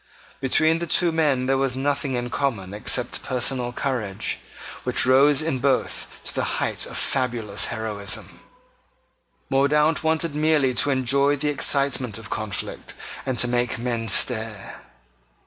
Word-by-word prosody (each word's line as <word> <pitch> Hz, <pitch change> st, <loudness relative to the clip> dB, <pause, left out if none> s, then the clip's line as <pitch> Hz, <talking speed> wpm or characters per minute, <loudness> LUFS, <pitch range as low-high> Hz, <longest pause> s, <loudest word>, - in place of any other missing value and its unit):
Between 155 Hz, +5 st, +3 dB
the 170 Hz, -, -3 dB
two 170 Hz, +2 st, +3 dB
men 145 Hz, -6 st, +1 dB
there 135 Hz, 0 st, +1 dB
was 135 Hz, -2 st, 0 dB
nothing 140 Hz, 0 st, -1 dB
in 120 Hz, 0 st, -3 dB
common 105 Hz, -9 st, -2 dB
except 105 Hz, -, +1 dB
personal 125 Hz, -1 st, -1 dB
courage, 120 Hz, -7 st, -2 dB, 0.4 s
which -, -, +2 dB
rose 135 Hz, +3 st, +5 dB
in 155 Hz, -5 st, -1 dB
both 135 Hz, 0 st, -1 dB
to -, -, -5 dB
the -, -, -1 dB
height -, -, -1 dB
of -, -, -7 dB
fabulous 120 Hz, -6 st, -1 dB
heroism. 105 Hz, -3 st, -4 dB, 1.1 s
Mordaunt 150 Hz, +4 st, +3 dB
wanted 160 Hz, 0 st, +1 dB
merely 150 Hz, -3 st, +2 dB
to 135 Hz, -, +2 dB
enjoy 140 Hz, +2 st, +2 dB
the 150 Hz, +1 st, -1 dB
excitement 140 Hz, -5 st, +1 dB
of 115 Hz, -2 st, -10 dB
conflict, 110 Hz, -3 st, -4 dB, 0.3 s
and 130 Hz, -2 st, -1 dB
to 125 Hz, -, +3 dB
make 120 Hz, +1 st, 0 dB
men 115 Hz, -1 st, -2 dB
stare. 110 Hz, -4 st, 0 dB
130 Hz, 140 wpm, -23 LUFS, 120-145 Hz, 1.1 s, rose